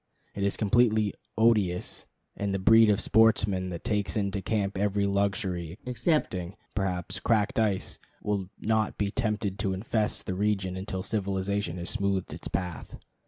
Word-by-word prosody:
It 100 - -5
is 100 0 +1
completely 110 -1 +3 0.2
odious; 105 -6 +2 0.3
and 100 -1 -2
the - - +1
breed 110 +3 +6
of 100 - +3
sportsmen 105 -4 +3
that 85 -2 -6
takes 105 -5 0
into 100 -1 -1
camp 100 -1 -1
every 100 +1 +1
luxury 100 -4 -1
excepting, 120 - 0 0.2
perhaps, 90 -4 -2
cracked 115 +2 +1
ice, 105 -4 0 0.2
will 100 -3 -2
not 110 -1 0
be 100 -1 0
tempted 105 -4 -1
to 95 -3 0
infest 105 +2 -1
the 95 - -2
region 95 -1 0
until 95 0 -4
civilization 100 -3 -1
has 85 0 -4
smoothed 100 -2 -1
its - - -7
path. 90 -1 -4
100 Hz, 150 wpm, -28 LUFS, 95-110 Hz, 0.3 s, breed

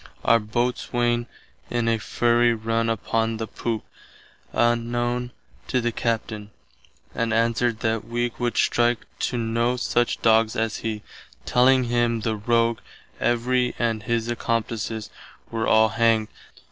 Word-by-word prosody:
Our 115 - +5
Boatswaine 120 +1 -1 0.4
in 120 -1 0
a 115 -1 +2
fury 120 +1 +2
run 115 +1 0
upon 115 +1 -1
the 110 - -3
poop, 110 +1 -3 0.7
unknown 120 +1 0 0.4
to 130 - +1
the 120 0 0
Captain, 110 -3 -2 0.6
and 115 -1 -1
answered 115 0 +1
that 110 -2 0
wee 120 +1 -1
would 120 -1 -1
strike 120 0 +2
to 125 - -1
noe 115 +1 0
such 120 -1 0
doggs 110 0 +4
as 110 -1 -1
he, 110 -2 -4 0.4
telling 130 +1 +4
him 120 -1 +1
the 110 0 -1
rogue 115 +1 +1 0.4
Every 125 +1 +1
and 115 -2 0
his 115 +1 -1
accomplices 115 -2 -2 0.4
were 115 -1 -1
all 110 0 +5
hanged. 115 -1 +2
115 Hz, 130 wpm, -24 LUFS, 115-120 Hz, 0.7 s, Our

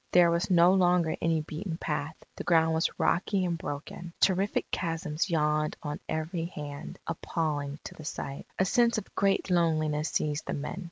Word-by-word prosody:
There 175 -1 +7
was 170 +1 0
no 175 0 +6
longer 180 -3 +3
any 165 -1 +2
beaten 160 +3 -5
path; 150 -2 -3 0.2
the - - -5
ground 160 -1 +4
was 160 0 +2
rocky 190 +1 +2
and 175 -1 0
broken. 160 +3 -6
Terrific 195 +1 +2
chasms 165 -1 -1
yawned 150 -2 +1
on 150 -1 -4
every 165 +2 -2
hand, 145 -4 -7
appalling 150 -3 -2
to - - -7
the 155 - -11
sight. 140 -2 -5
A 190 - +3
sense 235 +3 +3
of 215 - -6
great 195 -1 +1
loneliness 155 -3 +2
seized 150 0 -1
the - - -1
men. 150 +6 -4
165 Hz, 170 wpm, -29 LUFS, 150-180 Hz, 0.2 s, There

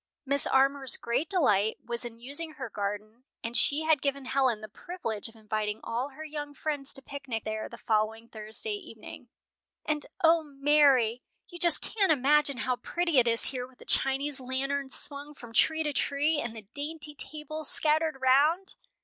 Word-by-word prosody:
Mrs. 280 +1 +2
Armour's 270 0 +3
great 250 +7 -1
delight 220 - +2
was 235 +1 -1
in 235 -1 -6
using 285 +7 -5
her 265 -6 -7
garden, 210 +3 -5 0.2
and 230 0 -4
she 290 +5 +2
had 315 -3 +3
given 280 -1 -2
Helen 255 -4 +1
the 215 - -7
privilege 230 - -5
of 225 - -19
inviting 215 -1 -3
all 245 +4 -2
her 310 +3 -9
young 295 -1 -6
friends 290 -3 -3
to 270 - -9
picnic 275 -6 -5
there 215 0 -4
the 235 - -10
following 220 +1 -1
Thursday 220 - -4
evening. 285 - -10 0.6
"And, 300 -1 -1 0.2
O 330 0 +6
Mary, 275 -5 +3 0.3
you 345 - -9
just 340 -3 +3
can't 400 -6 +1
imagine 290 0 +3
how 250 +1 -1
pretty 335 +3 +1
it 240 - +3
is 230 0 +5
here 250 -2 -1
with 260 -1 -22
the - - -15
Chinese 270 +1 +1
lanterns 265 +2 -2
swung 290 +1 +2
from 235 -4 -12
tree 320 +6 +3
to 295 -1 -1
tree, 290 +2 +1
and 230 -1 -5
the 220 -2 -10
dainty 300 +1 -5
tables 305 +1 -2
scattered 310 -1 +2
round!" 295 +9 +3
275 Hz, 175 wpm, -29 LUFS, 235-300 Hz, 0.6 s, O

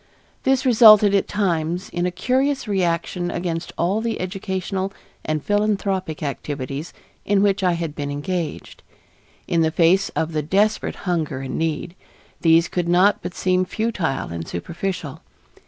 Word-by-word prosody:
This 265 0 +1
resulted 215 -4 +7
at 200 - +2
times 175 -3 -1
in 175 +1 -1
a - - +1
curious 260 +8 0
reaction 175 -2 -1
against 170 -2 -3
all 190 +6 +1
the 230 -1 -2
educational 190 0 -3 0.3
and 155 -1 -2
philanthropic 195 -5 0
activities 140 +1 -4 0.3
in 200 -1 +2
which 200 -1 +2
I 180 -2 +2
had 165 -3 -3
been 145 -1 -4
engaged. 155 +2 -4 0.7
In 170 - +2
the 160 - +3
face 175 +4 +3
of 160 0 -1
the 155 - 0
desperate 200 +8 +1
hunger 160 -7 -1
and 135 -1 -5
need, 165 +1 -2 0.5
these 165 0 +5
could 175 -1 -2
not 185 +4 +4
but - - -6
seem 185 0 +1
futile 185 -8 -2
and 85 -1 -5
superficial. 165 - -5
180 Hz, 145 wpm, -22 LUFS, 160-200 Hz, 0.7 s, resulted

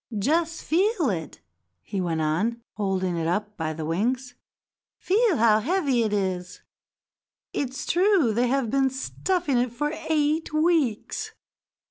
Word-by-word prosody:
"Just 320 +9 0
feel 355 - +2
it," 160 -5 -6 0.4
he 195 - -3
went 165 -3 -1
on, 185 +10 0
holding 190 -3 -1
it 165 -1 -1
up 210 +4 -1
by 160 -4 -2
the 155 0 -5
wings. 245 +10 -1 0.6
"Feel 425 0 +2
how 220 -1 +5
heavy 280 - +1
it 220 -2 0
is; 185 -3 -2 0.9
it's 265 -2 -3
true 355 - +3
they 240 +3 +2
have 260 -2 0
been 270 0 +3
stuffing 280 +2 -1
it 245 -1 0
for 295 +6 -2 0.2
eight 310 +1 +1
weeks. 310 -8 0
245 Hz, 135 wpm, -25 LUFS, 195-310 Hz, 0.9 s, how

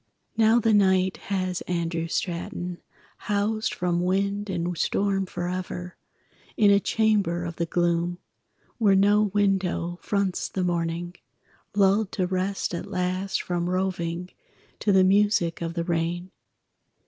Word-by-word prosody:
Now 225 +1 +5
the 225 -1 +2
night 190 -2 +3
has 185 -2 -1
Andrew 170 -1 -1
Straton 175 0 -3 0.4
Housed 210 +2 -1
from 175 -1 -1
wind 200 +3 0
and 175 -1 -2
storm 195 +2 0
forever 180 0 -4 0.6
In 205 -2 +5
a 200 - +6
chamber 200 -6 +1
of 170 -1 -6
the 170 - -1
gloom 175 0 0 0.6
Where 205 -4 +4
no 205 +2 +4
window 190 -4 0
fronts 200 -3 -1
the 185 - -2
morning, 175 0 -1 0.6
Lulled 200 +1 +3
to 185 - 0
rest 185 +1 -2
at 170 +3 -4
last 185 0 -1
from 175 0 -2
roving 180 -1 -2 0.5
To 205 - +1
the 190 -1 +5
music 190 -3 +2
of 165 0 -3
the 170 - -1
rain. 170 +1 -2
185 Hz, 130 wpm, -25 LUFS, 175-200 Hz, 0.6 s, a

